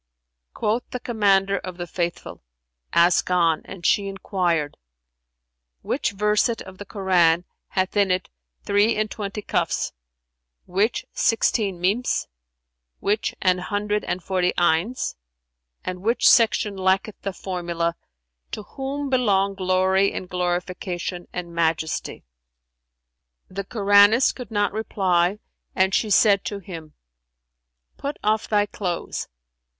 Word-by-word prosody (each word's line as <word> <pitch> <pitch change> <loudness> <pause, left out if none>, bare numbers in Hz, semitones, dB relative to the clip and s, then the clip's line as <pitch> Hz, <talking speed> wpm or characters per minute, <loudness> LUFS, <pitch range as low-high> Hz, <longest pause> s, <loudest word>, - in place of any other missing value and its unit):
Quoth 220 +3 0
the 250 - -4
Commander 200 -4 +2
of 180 -1 -8
the 175 - -4
Faithful, 170 0 -4 0.5
"Ask 170 +2 +4
on," 170 -3 +3
and 180 -3 -9
she 200 +2 +3
enquired, 175 -6 -1 1.1
"Which - - -1
verset 210 +3 +1
of 190 0 -13
the 205 - -7
Koran 180 -4 +2 0.2
hath 185 +1 -1
in 200 -2 +3
it 185 0 0 0.4
three 205 +2 +3
and 215 0 -1
twenty 205 0 -5
Kαfs, - - -1 0.7
which 200 +6 0
sixteen 210 -4 +1
Mνms, 200 +8 +1 0.7
which 210 +2 0
an 185 -1 +3
hundred 205 +2 -1
and 175 0 -3
forty 180 -2 +1
'Ayns[FN#384] 175 +8 +1 0.7
and 185 0 -4
which 230 +5 +1
section[FN#385] 215 -4 +4
lacketh 190 +3 0
the 195 - -3
formula, 170 -2 -2 0.5
'To 215 - -6
Whom 275 +4 -4
belong 200 -7 +2
glory 190 +1 +2
and 185 - -5
glorification 180 0 -3
and 170 -1 -6
majesty[FN#386]?'" 160 -1 -1 1.3
The 195 +1 -4
Koranist 205 +3 +5
could 250 -5 -8
not 205 -2 0
reply, 190 -3 +1 0.4
and 190 0 +2
she 215 - +1
said 200 -1 +5
to 205 - -3
him, 165 -5 -9 1.0
"Put 285 +1 -4
off 215 +1 +1
thy 205 -1 +3
clothes." 180 -4 -4
195 Hz, 120 wpm, -23 LUFS, 180-210 Hz, 1.3 s, Koranist